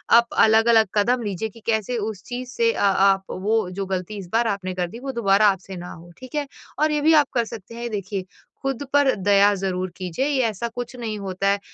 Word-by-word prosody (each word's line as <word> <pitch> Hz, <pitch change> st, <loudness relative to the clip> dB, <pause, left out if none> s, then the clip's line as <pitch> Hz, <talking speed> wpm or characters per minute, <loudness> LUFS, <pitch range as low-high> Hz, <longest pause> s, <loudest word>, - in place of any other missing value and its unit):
आप 235 Hz, 0 st, +6 dB
अलग-अलग 220 Hz, 0 st, +5 dB
कदम 245 Hz, +4 st, +2 dB
लीजिए 205 Hz, +2 st, -3 dB
कि 230 Hz, -, -16 dB
कैसे 225 Hz, +2 st, 0 dB
उस 210 Hz, -3 st, -4 dB
चीज़ 250 Hz, 0 st, -6 dB
से 460 Hz, -, +2 dB
अ -, -, -5 dB, 0.2 s
आप 195 Hz, 0 st, +4 dB
वो 210 Hz, +1 st, 0 dB
जो 195 Hz, +1 st, -4 dB
गलती 190 Hz, +2 st, -4 dB
इस 195 Hz, -3 st, -7 dB
बार 230 Hz, 0 st, +3 dB
आपने 190 Hz, -3 st, -2 dB
कर 180 Hz, -1 st, -1 dB
दी 230 Hz, -, -9 dB
वो 270 Hz, +1 st, -4 dB
दोबारा 210 Hz, -3 st, +3 dB
आपसे 190 Hz, -1 st, -1 dB
ना 175 Hz, 0 st, -8 dB
हो, 175 Hz, +1 st, -12 dB
ठीक 255 Hz, +3 st, -11 dB
है? 290 Hz, -1 st, -1 dB, 0.3 s
और 310 Hz, +1 st, +3 dB
ये 300 Hz, -1 st, 0 dB
भी 315 Hz, +2 st, +5 dB
आप 295 Hz, -2 st, +5 dB
कर 235 Hz, -2 st, +1 dB
सकते 225 Hz, 0 st, -10 dB
हैं 235 Hz, 0 st, -4 dB
देखिए, 195 Hz, -2 st, -4 dB, 0.4 s
खुद 270 Hz, 0 st, -2 dB
पर 285 Hz, -2 st, +4 dB
दया 200 Hz, +1 st, +4 dB
ज़रूर 185 Hz, -1 st, -2 dB
कीजिए 185 Hz, +7 st, -2 dB
ये 280 Hz, -3 st, +1 dB
ऐसा 220 Hz, +2 st, -3 dB
कुछ 245 Hz, +1 st, -5 dB
नहीं 225 Hz, -3 st, -4 dB
होता 195 Hz, 0 st, -2 dB
है, 200 Hz, 0 st, +2 dB
215 Hz, 230 wpm, -23 LUFS, 195-245 Hz, 0.4 s, आप